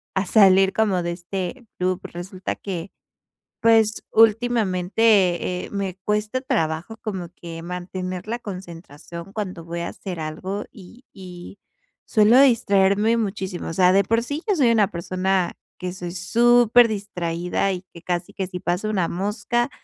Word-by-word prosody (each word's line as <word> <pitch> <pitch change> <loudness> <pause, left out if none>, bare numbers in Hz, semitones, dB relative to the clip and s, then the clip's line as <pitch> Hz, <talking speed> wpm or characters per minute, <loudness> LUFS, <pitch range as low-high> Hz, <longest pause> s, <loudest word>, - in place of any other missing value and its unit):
a 190 +1 +1
salir 195 -1 +5
como 200 -5 +1
de 170 - -2
este 185 +7 -5
loop. 185 0 -1
Resulta 185 +2 -6
que, 190 -1 -6 0.7
pues, 225 -1 +3
últimamente, 210 -4 +2
eh, - - -13
me 195 -2 -3
cuesta 210 +5 -1
trabajo 210 - -2
como 190 -5 -4
que 165 -1 -8
mantener 180 +1 -5
la 235 +2 -3
concentración 170 -3 -9
cuando 185 -6 -5
voy 170 +1 -4
a 170 - -3
hacer 185 -3 -7
algo 175 +6 -4
y 225 +7 -15
y 180 0 -11 0.5
suelo 220 +4 +5
distraerme 215 -3 +3
muchísimo, 190 -4 -3
o - - -4
sea, 180 +1 +5
de 195 +1 +5
por 230 +4 +1
sí, 285 +6 -4
yo 405 - +3
soy 260 -7 +4
una 215 -4 +3
persona 185 +1 -1 0.3
que 180 0 -4
soy 175 -2 -6
súper 240 +5 +4
distraída 180 -3 -2
y 180 0 -6
que 170 - -12
casi, 175 0 -3
que 190 - -3
si 180 0 -7
pasó 180 +6 -1
una 185 -5 0
mosca, 210 +7 -1
190 Hz, 150 wpm, -23 LUFS, 180-220 Hz, 0.7 s, salir